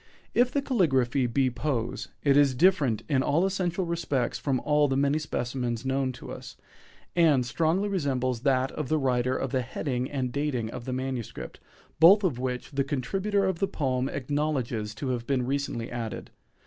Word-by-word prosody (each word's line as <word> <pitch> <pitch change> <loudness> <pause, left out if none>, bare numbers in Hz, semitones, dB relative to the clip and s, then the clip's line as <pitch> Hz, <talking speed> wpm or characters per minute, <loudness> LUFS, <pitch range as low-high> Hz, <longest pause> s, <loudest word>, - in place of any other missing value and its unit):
If 245 +1 +3
the 280 +1 0
caligraphy 135 - +2
be 130 +2 +1
Poe's, 125 -1 -2 0.2
it 140 -2 +4
is 140 -2 +4
different 140 - +3
in 140 -4 +2
all 160 +7 +2
essential 185 -1 -1
respects 145 -7 -1
from 135 -3 0
all 150 0 +3
the 135 -1 0
many 140 +2 +2
specimens 125 -4 -3
known 135 0 0
to 125 - -9
us, - - -9 0.6
and 155 -7 +4
strongly 165 +9 +1
resembles 130 - -1
that 130 0 +2
of 150 -4 -4
the 155 - +2
writer 130 -2 +1
of - - -3
the 130 -2 +1
heading 125 +1 -3
and 130 -3 -2
dating 130 -5 -2
of 120 - -7
the 130 - -3
manuscript, 130 -3 -5 0.4
both 190 +6 +8
of 150 -10 0
which 125 +1 -3
the 140 -1 0
contributor 190 +9 0
of 190 -3 -1
the 195 - +1
poem 130 -5 -1
acknowledges 130 -6 -2
to 135 +2 -4
have 120 -2 -2
been 130 -3 +1
recently 135 -3 -2
added. 115 -3 -5
135 Hz, 175 wpm, -27 LUFS, 125-155 Hz, 0.6 s, both